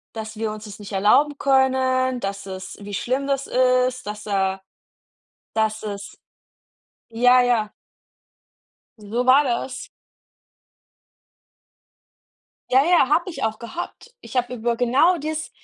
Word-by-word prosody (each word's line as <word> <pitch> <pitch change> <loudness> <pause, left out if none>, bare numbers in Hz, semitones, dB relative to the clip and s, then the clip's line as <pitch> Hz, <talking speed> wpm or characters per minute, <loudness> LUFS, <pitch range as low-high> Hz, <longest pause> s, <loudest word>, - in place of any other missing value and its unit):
dass 220 0 -6
wir 220 -1 -2
uns 215 +1 -8
das 210 0 -9
nicht 205 0 -10
erlauben 245 +9 +3
können, 260 -1 +2
dass 200 -2 -5
es 190 -1 -8
wie 205 0 -8
schlimm 255 +7 -1
das 275 -1 -1
ist, 255 0 +2
dass 210 0 -6
er 190 -1 0 0.9
dass 220 0 0
es 200 -1 -7 0.9
ja, 245 +2 +5
ja. 235 -4 +1 1.3
So 220 +4 -3
war 270 +3 +6
das. 255 0 -3 2.8
Ja, 265 +3 +6
ja, 335 -6 +4
habe 340 +5 +2
ich 345 - -6
auch 220 -1 -1
gehabt. 345 - -8
Ich - - -10
habe 250 0 0
über 235 0 -1
genau 270 +9 +3
dies 310 +1 -4
245 Hz, 125 wpm, -22 LUFS, 215-265 Hz, 2.8 s, war